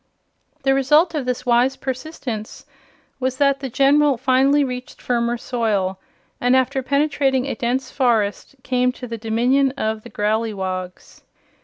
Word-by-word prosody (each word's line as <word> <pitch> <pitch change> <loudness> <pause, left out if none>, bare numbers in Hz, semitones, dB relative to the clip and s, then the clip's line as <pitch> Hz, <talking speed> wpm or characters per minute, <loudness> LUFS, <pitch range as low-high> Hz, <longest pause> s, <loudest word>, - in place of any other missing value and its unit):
The 270 - +3
result 300 +6 +3
of 285 -5 -3
this 250 -1 -2
wise 245 +2 +3
persistence 255 -5 -6 0.5
was 260 0 -1
that 275 -1 +2
the 270 -1 -5
General 280 +2 +3
finally 270 +3 +3
reached 250 -1 -6
firmer 240 -1 0
soil 210 -6 -1 0.4
and, 245 +1 +3
after 260 +1 +1
penetrating 275 -1 +1
a 275 - -2
dense 255 +2 -2
forest, 230 -2 0
came 250 0 +1
to 250 - -8
the 230 -2 -6
Dominion 245 +5 +2
of 220 -2 -2
the - - -12
Growleywogs. 200 -4 -3
255 Hz, 140 wpm, -21 LUFS, 230-270 Hz, 0.5 s, The